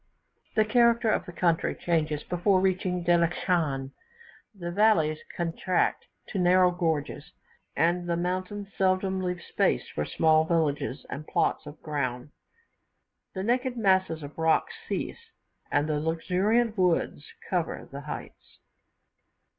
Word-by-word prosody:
The 215 - +4
character 235 0 +3
of - - -1
the - - -6
country 170 -1 +1
changes 155 -3 -1
before 185 +2 +2
reaching 185 -1 0
Delischan: 170 -5 +1 0.6
the 175 -5 -6
valleys 175 -6 +3 0.2
contract 175 +1 0 0.2
to 195 - -3
narrow 180 0 +5
gorges, 165 -5 -2 0.4
and 175 +1 +1
the 170 - +1
mountains 185 +3 -3
seldom 190 0 +1
leave 180 -1 -3
space - - 0
for 75 - -3
small 155 - +3
villages 155 -5 -1
and 150 +2 -6
plots - - 0
of 145 - -10
ground. 140 -3 -3 1.0
The 190 - -3
naked 245 +3 0
masses 190 -7 +2
of 145 +3 -9
rock 160 - +2 0.2
cease, 465 -1 -4 0.4
and 145 +1 +2
luxuriant 185 +9 0
woods 175 -5 +1 0.2
cover 175 -4 -2
the 140 +1 -7
heights. 150 - -9
175 Hz, 125 wpm, -27 LUFS, 155-190 Hz, 1.0 s, narrow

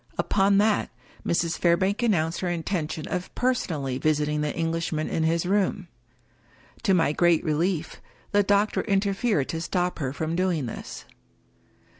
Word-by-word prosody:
Upon 195 0 +2
that, 210 0 +2 0.3
Mrs. 170 0 0
Fairbank 185 +5 +2
announced 170 -8 +1
her 185 - -2
intention 165 -2 -3
of 180 0 -3
personally 155 - -1
visit 150 -1 +1
ing 150 0 -1
the 150 -1 -1
Englishman 165 -1 -1
in - - -1
his 165 +2 +1
room. 190 -1 0 0.9
To 195 -5 +3
my 165 -4 +3
great 175 0 +3
relief, 165 +1 -1 0.3
the 205 - +4
doctor 205 +1 +2
interfered 195 - +1
to 165 - -3
stop 180 +1 -1
her 135 -4 -2
from 160 +3 -3
doing 175 -6 0
this. 115 - -7
170 Hz, 145 wpm, -25 LUFS, 155-195 Hz, 0.9 s, the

